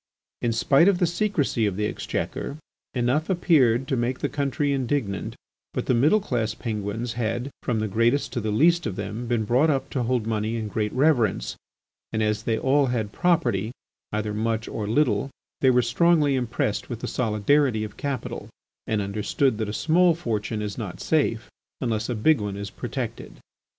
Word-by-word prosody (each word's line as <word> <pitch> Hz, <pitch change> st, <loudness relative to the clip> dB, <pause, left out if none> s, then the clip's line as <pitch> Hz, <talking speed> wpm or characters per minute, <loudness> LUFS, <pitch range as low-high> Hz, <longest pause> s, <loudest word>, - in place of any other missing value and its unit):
In 120 Hz, -, +1 dB
spite 135 Hz, +8 st, +4 dB
of 200 Hz, -3 st, +4 dB
the 175 Hz, -, +2 dB
secrecy 165 Hz, -, 0 dB
of 100 Hz, -, -2 dB
the 105 Hz, +2 st, -1 dB
Exchequer, 140 Hz, +6 st, -3 dB, 0.4 s
enough 125 Hz, +7 st, +1 dB
appeared 135 Hz, -9 st, +3 dB
to 140 Hz, -, 0 dB
make 125 Hz, +1 st, -1 dB
the -, -, -2 dB
country 140 Hz, 0 st, 0 dB
indignant, 130 Hz, -7 st, -2 dB, 0.4 s
but -, -, -1 dB
the -, -, +2 dB
middle 145 Hz, -, +4 dB
class 115 Hz, -, -2 dB
Penguins 110 Hz, +1 st, -3 dB
had, 120 Hz, +3 st, -2 dB
from 120 Hz, -3 st, -1 dB
the 110 Hz, -, -1 dB
greatest 115 Hz, +7 st, +1 dB
to 120 Hz, -, -1 dB
the 110 Hz, -, -2 dB
least 165 Hz, +8 st, +3 dB
of 100 Hz, -, -4 dB
them, 105 Hz, +5 st, -5 dB
been 115 Hz, -2 st, +1 dB
brought 130 Hz, +8 st, +3 dB
up 135 Hz, -2 st, 0 dB
to 130 Hz, -, -1 dB
hold 120 Hz, -1 st, 0 dB
money 110 Hz, 0 st, -1 dB
in 110 Hz, -2 st, -3 dB
great 105 Hz, 0 st, -1 dB
reverence, 125 Hz, -, +2 dB, 0.6 s
and 110 Hz, -, 0 dB
as 105 Hz, 0 st, 0 dB
they 115 Hz, -1 st, 0 dB
all 140 Hz, +1 st, +3 dB
had 115 Hz, -4 st, -1 dB
property, 115 Hz, -, +1 dB, 0.4 s
either 105 Hz, 0 st, -2 dB
much 110 Hz, +1 st, -1 dB
or 105 Hz, -2 st, -4 dB
little, 115 Hz, -1 st, +2 dB, 0.3 s
they 130 Hz, -, +4 dB
were 125 Hz, -1 st, +4 dB
strongly 150 Hz, +3 st, +3 dB
impressed 120 Hz, -5 st, -1 dB
with 120 Hz, -2 st, -5 dB
the -, -, -3 dB
solidarity 115 Hz, +1 st, +2 dB
of 105 Hz, -1 st, -7 dB
capital 140 Hz, -2 st, -4 dB, 0.4 s
and 110 Hz, -2 st, 0 dB
understood 105 Hz, +5 st, 0 dB
that 110 Hz, -2 st, -1 dB
a -, -, -2 dB
small 165 Hz, +8 st, +3 dB
fortune 110 Hz, -7 st, -2 dB
is 105 Hz, +2 st, -4 dB
not 95 Hz, -6 st, -5 dB
safe 120 Hz, -7 st, 0 dB, 0.3 s
unless 110 Hz, -3 st, -1 dB
a 120 Hz, -, -1 dB
big 120 Hz, +4 st, +3 dB
one 100 Hz, -1 st, -3 dB
is 100 Hz, -1 st, -6 dB
protected. -, -, -5 dB
120 Hz, 180 wpm, -25 LUFS, 110-140 Hz, 0.6 s, spite